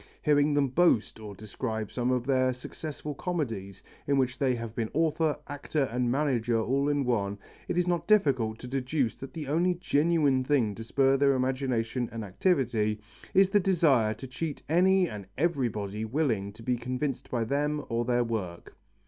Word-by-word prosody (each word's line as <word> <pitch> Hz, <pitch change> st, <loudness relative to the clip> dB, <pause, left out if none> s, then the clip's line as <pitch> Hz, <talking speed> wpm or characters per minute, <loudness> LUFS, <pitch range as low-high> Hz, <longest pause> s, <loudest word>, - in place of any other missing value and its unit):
Hearing 145 Hz, -1 st, +3 dB
them 140 Hz, -2 st, +2 dB
boast, 130 Hz, -7 st, +2 dB
or 105 Hz, -2 st, -8 dB
describe 110 Hz, +1 st, -4 dB
some 125 Hz, 0 st, -1 dB
of 125 Hz, -1 st, 0 dB
their 130 Hz, -1 st, +2 dB
successful 150 Hz, +4 st, -7 dB
comedies 115 Hz, -, -4 dB, 0.2 s
in 140 Hz, -1 st, +2 dB
which 130 Hz, -1 st, 0 dB
they 130 Hz, -3 st, +2 dB
have 115 Hz, -2 st, -6 dB
been 115 Hz, -2 st, -2 dB
author, 160 Hz, -1 st, +1 dB
actor 145 Hz, +1 st, -2 dB
and 125 Hz, -1 st, -1 dB
manager 120 Hz, -4 st, +1 dB
all 135 Hz, +6 st, +1 dB
in 145 Hz, -2 st, +1 dB
one, 100 Hz, -5 st, 0 dB, 0.3 s
it -, -, -2 dB
is 180 Hz, -, +3 dB
not 175 Hz, -1 st, -1 dB
difficult 130 Hz, -, +3 dB
to 125 Hz, -, -9 dB
deduce 130 Hz, -1 st, -1 dB
that 135 Hz, -, -8 dB
the 155 Hz, -4 st, -6 dB
only 175 Hz, +5 st, +2 dB
genuine 150 Hz, -5 st, +2 dB
thing 130 Hz, -6 st, +1 dB
to 115 Hz, -, -8 dB
spur 135 Hz, +3 st, +2 dB
their 140 Hz, 0 st, +4 dB
imagination 130 Hz, -2 st, -1 dB
and 115 Hz, -1 st, -5 dB
activity 110 Hz, -, 0 dB, 0.4 s
is 195 Hz, 0 st, +5 dB
the 205 Hz, -, +5 dB
desire 150 Hz, -, +3 dB
to 130 Hz, -, -9 dB
cheat 145 Hz, +4 st, -5 dB
any 185 Hz, +3 st, +4 dB
and 105 Hz, -, -8 dB
everybody 115 Hz, -, -1 dB
willing 110 Hz, -5 st, -1 dB
to 115 Hz, +2 st, -13 dB
be 125 Hz, +1 st, 0 dB
convinced 125 Hz, +3 st, -3 dB
by 120 Hz, -2 st, 0 dB
them 145 Hz, +4 st, -1 dB
or 115 Hz, 0 st, -1 dB
their 120 Hz, 0 st, +1 dB
work. 100 Hz, -7 st, -5 dB
130 Hz, 175 wpm, -28 LUFS, 115-150 Hz, 0.4 s, is